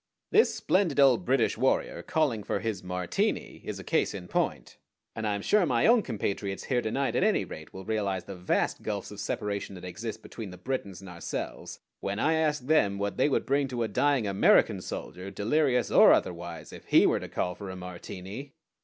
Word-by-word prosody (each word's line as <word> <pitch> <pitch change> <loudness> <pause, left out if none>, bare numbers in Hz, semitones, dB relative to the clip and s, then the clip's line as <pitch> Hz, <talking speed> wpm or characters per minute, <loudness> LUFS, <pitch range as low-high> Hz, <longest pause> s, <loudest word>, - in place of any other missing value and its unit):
This 435 +2 +4
splendid 180 -7 +1
old 140 +6 +5
British 135 +1 +2
warrior - - +1
calling 150 -10 0
for 100 - -2
his 110 -4 -3
Martini 90 -1 -2
is - - -5
a - - -8
case - - 0
in 90 -3 -7
point, - - -2 0.4
and 110 -1 -2
I 105 - +1
am 100 - -5
sure 210 -2 +4
my 120 -8 +2
own 235 0 +6
compatriots 100 - -3
here 125 -2 0
to 110 - -2
night 135 +4 -1
at - - +2
any 215 0 +2
rate 80 - -9
will 95 0 -9
realize 100 -4 -1
the 100 - -8
vast 90 0 0
gulfs 105 -2 -4
of 105 - -9
separation 100 -1 -3
that 90 - -9
exist 110 +4 -6
between 110 -4 -7
the 90 - -10
Britons 105 -8 -4
and 95 - -10
ourselves 85 -1 -6 0.2
when 100 0 -3
I 155 +8 +2
ask 155 -3 +1
them 105 -10 +3
what 100 0 -2
they 130 +3 +3
would - - 0
bring 140 +1 +1
to 125 -3 -2
a - - 0
dying 130 +3 +2
American 100 -1 +4
soldier, 95 +2 -6
delirious 125 +5 +1
or - - +8
otherwise, 85 -3 -2
if - - -11
he - - +5
were - - +3
to - - -8
call 90 - -1
for 95 +2 -8
a 95 - -6
Martini." 95 +8 -8
105 Hz, 205 wpm, -28 LUFS, 95-140 Hz, 0.4 s, or